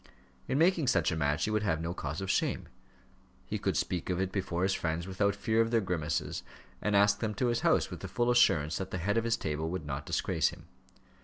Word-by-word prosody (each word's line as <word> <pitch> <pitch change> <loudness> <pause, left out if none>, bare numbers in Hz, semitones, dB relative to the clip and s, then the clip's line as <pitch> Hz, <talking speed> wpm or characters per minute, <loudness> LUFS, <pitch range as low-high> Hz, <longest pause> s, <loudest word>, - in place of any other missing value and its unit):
In 130 - 0
making 165 -2 +3
such 125 - +3
a - - -1
match 75 0 0
he 110 - -2
would 110 0 +1
have 85 -7 0
no 85 +1 -3
cause 95 - -4
of 95 -1 -1
shame. - - 0 0.8
He - - -3
could - - 0
speak 90 -1 -2
of 90 -1 0
it 95 0 -1
before 90 -2 -2
his 95 0 +2
friends 85 -1 -2
without 100 +1 0
fear 110 +2 +1
of 115 - +1
their 115 0 +3
grimaces, 85 -6 -2 0.4
and 105 -1 +1
ask 100 0 +4
them 110 -2 -2
to 125 +4 +1
his 120 - 0
house, - - +2
with - - -6
the - - -6
full 120 0 +1
assurance 85 -10 +3
that 95 -1 -4
the 95 - -3
head 105 +6 +1
of 115 - -4
his 115 0 +1
table 80 -2 -2
would 90 -2 -4
not 70 -1 -5
disgrace - - +1
him. - - -12
95 Hz, 240 wpm, -31 LUFS, 85-110 Hz, 0.8 s, ask